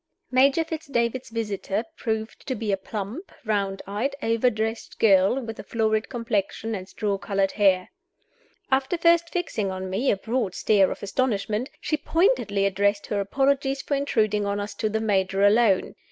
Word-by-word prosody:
MAJOR 275 +5 +4
FITZ 320 -1 -6
DAVID'S 240 -1 -1
visitor 210 -2 -2
proved 220 -4 -4
to 260 - -1
be 215 -2 -2
a - - +3
plump, 210 - -6
round 200 -2 -1
eyed 220 +8 -2
overdressed 225 -1 0
girl, 195 +3 +4
with 225 -3 -7
a - - -6
florid 220 -1 0
complexion 225 -2 -2
and 190 -2 -5
straw 200 -2 -2
colored 195 -1 0
hair. 190 -3 +2 0.8
After 270 +6 +2
first 335 0 +4
fixing 245 - -2
on 185 0 -5
me 230 +8 0
a - - +2
broad 225 -2 -2
stare 200 -3 +3
of - - -6
astonishment, 215 +2 -1
she 305 - -1
pointedly 310 - +1
addressed 200 +1 +1
her 205 - -2
apologies 275 +6 +1
for - - -3
intruding 220 -7 +1
on 200 0 -1
us 205 +1 -4
to 215 - -1
the 220 +1 -1
Major 195 -2 +1
alone. 205 -1 +4
220 Hz, 165 wpm, -25 LUFS, 200-260 Hz, 0.8 s, MAJOR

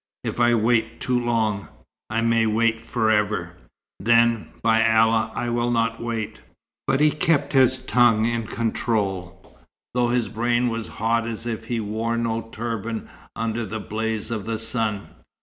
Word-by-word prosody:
"If - - -4
I 120 0 +4
'wait 115 0 +1
too 125 -1 0
long, 110 -4 0 0.4
I 110 +1 0
may 115 -1 +3
wait 115 +1 +1
for 115 -1 0
ever.' 105 -5 0 0.5
Then, 115 +1 +3 0.2
by 110 -1 +4
Allah, 115 0 +3
I 120 - -2
will 120 0 0
not 115 -1 0
wait." 110 -2 -4 0.5
But 135 0 +2
he 150 0 +5
kept 160 -1 +1
his 130 -1 +5
tongue 120 -4 +3
in 115 -1 -1
control, 100 -5 -2 0.4
though 125 0 +2
his 120 -2 +1
brain 120 +3 +1
was 115 -1 -3
hot 115 +1 +1
as 115 0 -5
if 115 -1 -4
he 115 0 -2
wore 110 +2 -2
no 115 -1 -1
turban, 115 -1 -4 0.3
under 115 +1 -2
the 110 +1 -5
blaze 110 +1 -3
of 110 -3 -4
the 115 -1 -1
sun. 110 -2 -2
115 Hz, 160 wpm, -23 LUFS, 110-120 Hz, 0.5 s, he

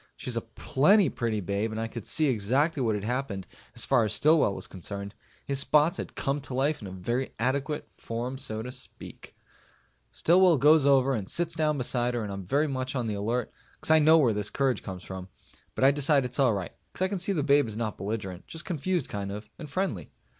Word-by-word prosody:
She's 125 - -3
a 115 - 0
plenty 150 - +3
pretty 115 -4 -2
babe 100 +4 -1
and 110 0 -5
I 115 - -1
could 115 -2 -8
see 155 - +1
exactly 135 +5 +1
what 110 -4 +1
had 100 - -4
happened 115 -5 -2 0.3
as - - 0
far 115 - +3
as 105 -1 -1
Stillwell 150 -5 +4
was - - -7
concerned. 100 +2 -7 0.3
His 140 -1 0
spots 150 +3 +3
had - - -6
come 140 +1 -1
to 130 -2 -6
life 140 +2 +1
in 95 -3 -8
very 125 +6 -2
adequate 140 +5 -1
form 120 +3 -4
so 110 -5 -4
to 125 - -6
speak. 125 0 -10 0.8
Stillwell 175 -1 +4
goes 150 +1 +5
over 135 -1 +4
and 105 -6 -3
sits 170 -1 0
down 155 -2 +1
beside 125 -1 0
her 120 - -1
and 100 -2 -5
I'm 100 -2 -7
very 145 +3 +2
much 130 -1 -3
on 125 -2 -1
the 110 - -2
alert, 110 +4 -2 0.2
because - - -3
I 160 - +7
know 155 +2 +6
where 130 -8 +3
his 105 0 -2
courage 135 -2 0
comes 95 -2 -7
from. 95 -1 -7 0.5
But - - -1
I 135 - +7
decide 145 -1 +3
it's 125 +3 -5
all 125 -6 +4
right, 95 -4 -4 0.2
because 185 - -1
I 200 - -3
see 185 +3 0
the 160 -7 0
babe 145 -3 +4
is 110 -1 -6
not 110 -2 -3
belligerent, 100 -3 -5
just 165 +1 -7
confused 175 -2 -1
kind 100 -1 -4
of. 105 +2 -8
And 155 -3 -8
friendly. 140 - -2
130 Hz, 220 wpm, -28 LUFS, 110-145 Hz, 0.8 s, I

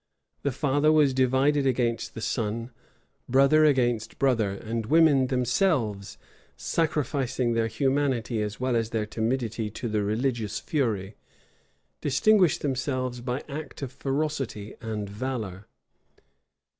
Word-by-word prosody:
The 140 - 0
father 145 +3 +2
was 150 -3 +4
divided 135 +2 +2
against 120 -3 -1
the 115 - -6
son; 115 +1 -2 0.6
brother 140 +4 +5
against 120 -6 +1
brother; 120 -7 +2
and 110 +3 -4
women 150 -3 +5
themselves, 125 - 0 0.4
sacrificing 135 -6 0
their 115 -1 +1
humanity 130 -1 0
as 105 -1 -4
well 130 -1 0
as 115 -1 0
their 110 -2 -1
timidity 115 0 -2
to 115 +3 -5
the 105 -1 0
religious 110 0 -1
fury, 110 - -2 0.8
distinguished 180 +5 +3
themselves 130 -2 -2
by 125 +2 -3
acts 150 -1 -7
of 130 - -4
ferocity 135 -8 -3
and 110 -3 -4
valor. 105 -3 -5
125 Hz, 120 wpm, -26 LUFS, 110-140 Hz, 0.8 s, brother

